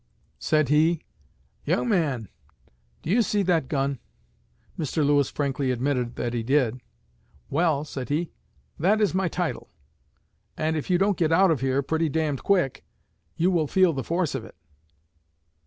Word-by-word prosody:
Said 155 -3 +1
he, 160 +2 +3 0.6
'Young - - 0
man, 150 - 0 0.8
do 160 - -2
you 235 +4 +4
see 210 -2 +1
that 170 -7 +1
gun?' 135 -1 -1 0.8
Mr. 155 0 -1
Lewis 145 -2 +3
frankly 140 -2 -1
admitted 125 -1 -1
that 120 -1 -3
he 120 - -1
did. 125 -1 +1 0.7
'Well,' 155 -1 +1
said 130 -4 -6
he, 155 +4 -1 0.5
'that 200 +7 +3
is 210 -4 +2
my 190 0 +1
title, - - -3 0.9
and 160 +1 0
if 155 - -4
you 180 - +4
don't 195 +1 +2
get 165 -2 +2
out 185 +2 +5
of 145 -6 0
here 135 +1 +1
pretty 160 +3 0
d 155 +1 0
d 140 - -3
quick 180 -5 0 0.5
you 180 +3 +2
will 165 -4 +1
feel 185 +1 +3
the 135 -2 -3
force 170 +1 -1
of 135 -4 -3
it.' - - -13
155 Hz, 160 wpm, -25 LUFS, 135-175 Hz, 0.9 s, out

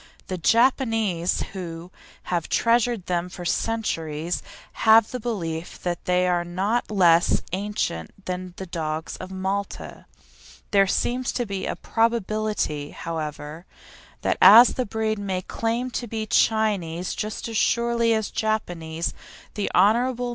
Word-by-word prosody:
The 185 - -2
Japanese, 225 - +2
who 175 -2 -7 0.3
have 175 -2 -2
treasured 230 -3 +2
them 175 0 -1
for 180 -1 -8
centuries, 170 -7 -2 0.4
have 220 0 +6
the 250 - -4
belief 175 -8 -4
that 175 -1 -3
they 180 0 +2
are 175 -1 +1
not 195 +7 -1
less 175 -4 +4
ancient 195 - -2 0.2
than 180 -1 -5
the 190 - -6
dogs 160 -2 -4
of 185 - -8
Malta. 190 +1 -4 0.6
There 195 -1 +4
seems 250 +5 0
to 245 - -1
be 195 -2 -4
a - - -2
probability, 215 -9 -1
however, 155 0 -6 0.6
that - - 0
the 235 +5 +8
breed 220 -1 -1
may 190 -2 -3
claim 235 +5 -2
to 240 - -4
be 220 0 -3
Chinese 200 -6 +1
just 215 +2 -4
as 225 - -6
surely 235 0 +2
as 220 -2 -2
Japanese. 170 -7 -2 0.4
The 205 -2 -2
Hon. 235 +7 +4
Mrs. 245 +1 -3
195 Hz, 135 wpm, -24 LUFS, 175-225 Hz, 0.6 s, the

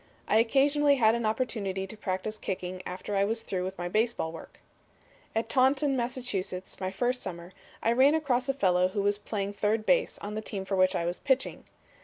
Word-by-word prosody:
I - - +4
occasionally 280 +5 +4
had 225 -4 +4
an 235 -1 0
opportunity 205 -5 -1
to 195 - -9
practice 210 +1 -3
kicking 185 -1 -4
after 185 +3 -4
I 195 - +3
was 225 +3 -1
through 185 -2 -2
with 190 +1 -5
my 175 - -3
baseball 215 -4 0
work. 165 - -11 0.8
"At 225 - 0
Taunton, 270 +2 +3
Mass., 245 0 -2 0.6
my 185 - -1
first 245 +6 -1
summer, 175 -1 -7 0.3
I 230 - +3
ran 265 +5 +5
across 265 -4 0
a 270 - +1
fellow 180 -6 +3
who 200 +2 -2
was 205 0 +1
playing 205 -1 -3
third 215 +2 0
base - - +2
on 205 +1 -6
the 215 - -3
team 195 -3 -5
for 195 - -1
which 185 0 +3
I 170 - 0
was 175 +1 -2
pitching. 265 -1 0
215 Hz, 200 wpm, -29 LUFS, 190-250 Hz, 0.8 s, ran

